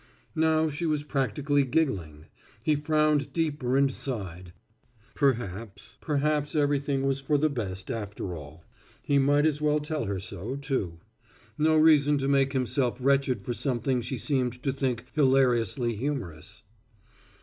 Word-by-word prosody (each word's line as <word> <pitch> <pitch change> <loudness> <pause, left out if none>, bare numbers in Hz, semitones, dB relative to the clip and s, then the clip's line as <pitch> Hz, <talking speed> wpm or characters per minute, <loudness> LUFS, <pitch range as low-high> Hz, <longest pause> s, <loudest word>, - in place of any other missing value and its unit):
Now 160 0 +3
she 155 +3 -3
was 150 -2 0
practically 145 0 0
giggling. 95 - -1 0.4
He 155 - +2
frowned 150 -1 +1
deeper 145 -6 0
and 140 -1 +3
sighed. 95 -10 -6 0.6
Perhaps, 115 -7 -2
perhaps 150 0 0
everything 140 -2 +1
was 135 0 0
for 145 +2 +1
the 155 +1 +1
best, 100 -4 -4
after 105 -5 -5
all. 75 +1 -11 0.4
He 140 -1 +2
might 145 +2 +3
as 150 -1 +1
well 150 0 +2
tell 150 -3 -3
her 100 -2 -2
so, 95 +6 -6
too. 130 - -3 0.5
No 155 +1 +3
reason 150 -2 +5
to 135 0 -1
make 135 0 +2
himself 130 -1 0
wretched 135 -1 +1
for 120 - -3
something 125 0 -1
she 125 +2 -4
seemed 125 -1 -1
to 135 - 0
think 130 -3 -2
hilariously 125 -4 +2
humorous. 120 - -5
135 Hz, 140 wpm, -27 LUFS, 120-150 Hz, 0.6 s, reason